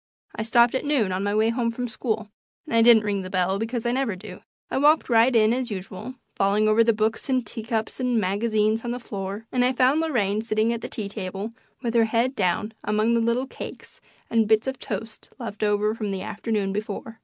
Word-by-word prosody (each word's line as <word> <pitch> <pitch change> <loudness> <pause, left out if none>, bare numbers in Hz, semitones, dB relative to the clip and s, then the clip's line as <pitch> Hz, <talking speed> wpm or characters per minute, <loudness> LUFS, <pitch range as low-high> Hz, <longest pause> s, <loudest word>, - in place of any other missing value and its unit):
I - - -3
stopped 235 +2 +4
at 260 - -1
noon 270 -10 +1
on 185 +1 -1
my 205 +1 0
way 220 +1 +3
home 230 0 0
from 245 +2 -3
school, 220 -1 -3 0.4
and - - -7
I 230 - +6
didn't 225 -2 +7
ring 205 -2 -1
the 185 - -7
bell, 185 +1 0
because 225 +1 -3
I 240 - +2
never 255 -5 0
do. 185 0 -10 0.3
I - - 0
walked 295 -1 +4
right 235 +2 +5
in 220 0 +5
as 250 0 -2
usual, 195 +4 -6 0.2
falling 200 +2 +2
over 215 +2 +5
the 230 - +4
books 220 +3 -1
and 255 -2 +1
teacups 225 +1 -4
and 250 -2 +1
magazines 215 +2 +1
on 240 - -3
the 245 +1 -3
floor, 200 -1 -6
and 250 -1 +2
I 250 +1 +2
found 260 +4 +3
Lorraine 215 -10 0
sitting 220 +1 +1
at 235 - -4
the - - -6
tea 210 -3 -4
table 200 +1 -5 0.3
with 235 -2 -1
her 230 -1 +4
head 235 +4 0
down 205 +2 0
among 215 +2 +1
the 230 - +3
little 235 +3 +1
cakes - - -10 0.3
and 225 -2 +2
bits 220 0 +3
of 265 -1 -3
toast 225 0 -6
left 225 -5 -7
over 210 0 +2
from 215 -2 -4
the 190 -1 -3
afternoon 205 -2 -2
before. 215 +2 -5
225 Hz, 225 wpm, -24 LUFS, 210-240 Hz, 0.4 s, didn't